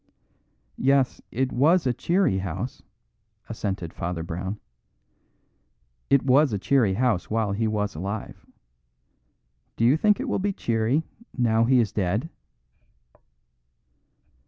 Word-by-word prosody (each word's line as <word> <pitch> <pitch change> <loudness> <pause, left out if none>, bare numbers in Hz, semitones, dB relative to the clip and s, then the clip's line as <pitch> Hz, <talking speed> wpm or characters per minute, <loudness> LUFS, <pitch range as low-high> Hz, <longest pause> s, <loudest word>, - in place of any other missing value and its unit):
"Yes, 135 0 +2
it 130 +2 -1
was 160 +6 +3
a 125 - +2
cheery 170 - +1
house," 95 +6 -5 0.7
assented 95 -5 -4
Father 85 -1 -4
Brown. 95 +5 -5 1.5
"It 140 -1 +3
was 135 +1 +4
a 105 - -1
cheery 110 -2 +2
house 115 -5 0
while 110 -2 0
he 110 +3 0
was 105 -1 -1
alive. 100 +6 -6 1.3
Do 115 - +2
you 125 +5 +5
think 210 +7 +2
it 270 - -3
will 225 - 0
be 200 +1 -1
cheery 115 +2 0 0.3
now 115 -2 +3
he 130 +1 +4
is 110 -4 +1
dead?" 105 - -1
115 Hz, 120 wpm, -25 LUFS, 100-135 Hz, 1.5 s, you